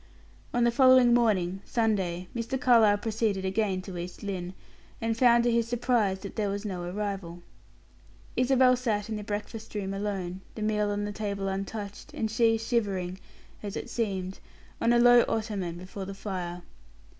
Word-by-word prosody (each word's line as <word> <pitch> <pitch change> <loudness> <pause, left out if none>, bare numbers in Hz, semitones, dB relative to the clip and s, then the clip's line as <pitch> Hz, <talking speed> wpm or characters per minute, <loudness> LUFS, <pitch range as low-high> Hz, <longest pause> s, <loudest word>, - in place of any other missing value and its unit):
On 240 - +1
the 235 - +4
following 255 -1 +6
morning, 195 -6 +2
Sunday, 190 -6 0
Mr. 235 +3 -2
Carlyle 230 -6 +5
proceeded 210 -2 -1
again 190 -1 0
to 185 -2 -6
East 175 +3 -7
Lynne, 185 -2 -4 0.4
and 225 0 -1
found, 235 0 +5
to 240 - +2
his 230 0 +1
surprise, 235 -5 +1
that 200 - -8
there 210 -2 0
was 200 +2 -4
no 185 -4 -3
arrival. 180 -2 -4 0.9
Isabel 255 0 +4
sat 220 -4 -1
in 220 - -2
the 210 - -5
breakfast 210 +2 -6
room 195 -2 -2
alone, 195 -2 -3
the 215 - -4
meal 210 -1 +1
on 205 0 -1
the 205 - -3
table 200 -2 -3
untouched, 200 +1 -5
and 220 -1 -2
she 225 0 +3
shivering 200 -6 -1 0.4
as 205 0 -5
it - - -6
seemed 190 -5 -2 0.4
on 230 - +3
a 240 - +5
low 245 0 +7
ottoman 200 -6 -2
before 185 +2 -7
the 195 +1 -7
fire. 180 -3 -5
205 Hz, 165 wpm, -28 LUFS, 190-230 Hz, 0.9 s, low